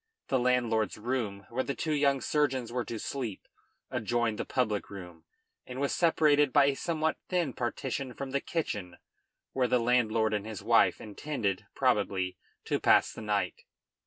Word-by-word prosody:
The 130 - +2
landlord's 120 -3 +1
room, 105 -4 -3
where 130 +3 0
the 140 - -3
two 155 - -1
young 140 -2 +2
surgeons 130 -4 0
were 125 -1 0
to 115 - -5
sleep, 115 -3 -4 0.4
adjoined 120 -2 0
the - - -2
public 110 -6 -1
room, 90 -5 -10 0.4
and 125 +1 -6
was 140 0 0
separated 150 -4 +4
by 145 0 +6
a 140 -1 +2
somewhat 160 +1 -1
thin 175 -7 0
partition 125 +1 -3
from 135 -1 -5
the 140 0 0
kitchen, 105 - -3 0.6
where 130 -2 +2
the 125 - +3
landlord 115 -2 +2
and 105 -1 0
his 110 -3 -7
wife - - +4
intended, 105 -3 -3
probably, 95 -2 +1 0.3
to - - 0
pass - - +4
the - - -8
night. 105 -2 -1
125 Hz, 160 wpm, -30 LUFS, 105-140 Hz, 0.6 s, by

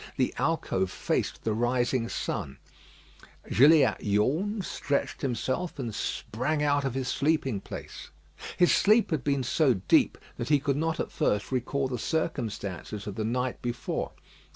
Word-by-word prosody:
The 130 -2 +1
alcove 115 - 0
faced - - -2
the 110 - 0
rising 120 +1 +1
sun. 65 0 -3 0.9
Gilliatt 145 +6 +5
yawned, 160 - +1
stretched 140 -1 -2
himself, 130 +8 -2
and 120 -5 -4
sprang 130 +8 -2
out 145 -1 +2
of 135 -2 -2
his 130 -1 -2
sleeping 135 -7 0
place. - - -8 0.5
His 175 - +5
sleep 215 0 +4
had 150 -6 0
been 140 -2 +1
so 130 +1 +3
deep 95 -1 +3 0.2
that 120 - -4
he 145 -2 +5
could 140 0 0
not 165 +2 -1
at - - -2
first 105 -9 0
recall 130 +2 0
the 125 -2 -4
circumstances 110 - -3
of 105 - -4
the 110 - -3
night 125 +3 -1
before. 120 0 -3
130 Hz, 150 wpm, -28 LUFS, 115-150 Hz, 0.9 s, Gilliatt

